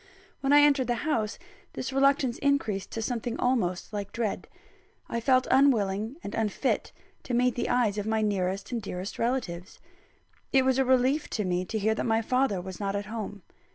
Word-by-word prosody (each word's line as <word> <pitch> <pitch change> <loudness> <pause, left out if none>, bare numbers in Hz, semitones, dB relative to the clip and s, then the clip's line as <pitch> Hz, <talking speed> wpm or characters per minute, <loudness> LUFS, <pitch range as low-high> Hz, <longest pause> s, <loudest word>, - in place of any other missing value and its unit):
When 275 0 0
I 290 0 +8
entered 280 -3 +4
the 240 - +1
house, 225 -9 0 0.4
this 265 - -4
reluctance 270 -2 +2
increased 225 -9 0
to 225 - -3
something 240 +1 -3
almost 215 -7 0
like 200 -1 -4
dread. 230 -3 -3 0.6
I 235 - -2
felt 255 +2 +3
unwilling 225 -4 +3
and 200 - -6
unfit 225 +4 -1 0.3
to 250 - -3
meet 250 0 +3
the 240 - -2
eyes 230 -4 +2
of 205 - -4
my 220 0 +1
nearest 195 -1 -1
and 235 -2 -2
dearest 190 -1 -6
relatives. 225 -7 -2 0.7
It 265 -1 +4
was 260 0 +2
a 265 - +3
relief 260 +4 +2
to 210 - -2
me 180 0 0
to 220 - -3
hear 220 +1 +2
that 220 - -2
my 225 0 +2
father 250 -4 +1
was 185 0 -7
not 200 -1 -2
at 200 0 -2
home. 210 -3 -6
225 Hz, 190 wpm, -28 LUFS, 200-260 Hz, 0.7 s, I